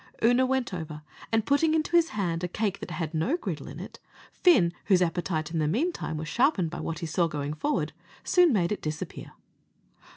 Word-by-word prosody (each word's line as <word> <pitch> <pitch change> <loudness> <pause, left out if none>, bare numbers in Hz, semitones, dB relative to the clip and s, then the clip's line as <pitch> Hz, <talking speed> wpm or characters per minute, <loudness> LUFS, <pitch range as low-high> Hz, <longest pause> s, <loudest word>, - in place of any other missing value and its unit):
Oonagh 245 +3 +4
went 260 -5 -1
over, 155 -3 -6 0.3
and 225 -1 +2
putting 310 +3 +3
into 315 +1 0
his 335 -1 +5
hand 170 -4 -1
a - - +1
cake 200 +2 -2
that - - -7
had 160 -1 -4
no 190 - +1
griddle 170 - -5
in 145 +4 -8
it, 190 - -9 0.3
Fin, 185 - +4
whose 190 -3 +4
appetite 165 -3 -1
in 165 - -1
the 155 - +1
meantime 230 - -1
was 155 +1 -5
sharpened 195 - +2
by - - -5
what 165 - -3
he 165 - -4
saw 170 +2 +1
going 150 -2 -3
forward, 295 - -1 0.3
soon 360 -3 +5
made 185 -6 +1
it 210 - -2
disappear. 155 -1 -5
180 Hz, 200 wpm, -27 LUFS, 160-255 Hz, 0.3 s, his